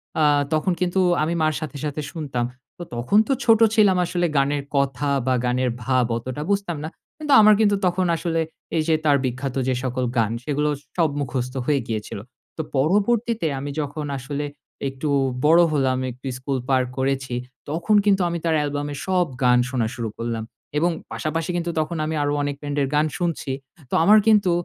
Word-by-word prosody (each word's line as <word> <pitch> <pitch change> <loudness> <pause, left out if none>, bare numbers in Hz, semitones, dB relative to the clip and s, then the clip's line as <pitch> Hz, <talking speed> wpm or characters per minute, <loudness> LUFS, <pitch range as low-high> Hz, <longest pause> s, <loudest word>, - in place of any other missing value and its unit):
অ্যা 155 - +3 0.3
তখন 155 +4 +1
কিন্তু 180 +1 +1 0.2
আমি 165 - 0
মার 155 0 +2
সাথে, 150 -3 -6
সাথে 150 +1 -3
শুনতাম। 135 -7 -3 0.3
তো 175 - -6
তখন 125 - +1
তো 275 - +2
ছোট 225 -1 +6 0.2
ছিলাম 205 -4 +5
আসলে 175 0 0
গানের 140 +1 +1
কথা 140 0 0 0.2
বা 130 - +3
গানের 125 +1 +1
ভাব 130 0 +2
অতটা 130 +4 -5
বুঝতাম 195 -5 -1
না। 155 - -4 0.3
কিন্তু 300 -2 0
আমার 215 0 +7
কিন্তু 205 -2 +4
তখন 180 +1 +1
আসলে 165 0 -1 0.4
এই 160 - +2
যে 160 - +4
তার 145 -2 +5
বিখ্যাত 130 +1 -3
যে 130 - +1
সকল 130 0 -1
গান, 110 -1 +2
সেগুলো 150 +2 0 0.3
সব 165 -2 +3
মুখস্থ 125 -2 -3
হয়ে 140 -2 +2
গিয়েছিল। 105 -2 -4 0.4
তো - - -1 0.2
পরবর্তীতে 210 - +1
আমি 145 +1 -4
যখন 145 +1 -4
আসলে 140 +3 -4 0.4
একটু 135 +3 -4 0.4
বড় 165 +3 +7
হলাম 130 -3 +1
একটু 125 +2 -15
স্কুল 130 +1 -2
পার 130 -1 +3
করেছি 130 -1 -1 0.3
তখন 170 +7 +1
কিন্তু 195 -2 +4
আমি 170 - -2
তার 160 - +2
অ্যালবামের 145 -1 -3
সব 180 -2 +2 0.2
গান 125 0 +5
শোনা 120 -4 0
শুরু 115 -2 -3
করলাম 115 -1 -3 0.3
এবং 170 +3 +2 0.2
পাশাপাশি 165 +2 -3
কিন্তু 170 0 -2
তখন 155 +2 -2
আমি 160 +1 -2
আরো 145 - 0
অনেক 145 0 -2
ব্যান্ডের 145 -1 -1
গান 150 - +3
শুনছি। 170 -6 -2 0.4
তো - - -10
আমার 210 +4 +7
কিন্তু 210 -5 +5
150 Hz, 180 wpm, -23 LUFS, 130-170 Hz, 0.4 s, আমার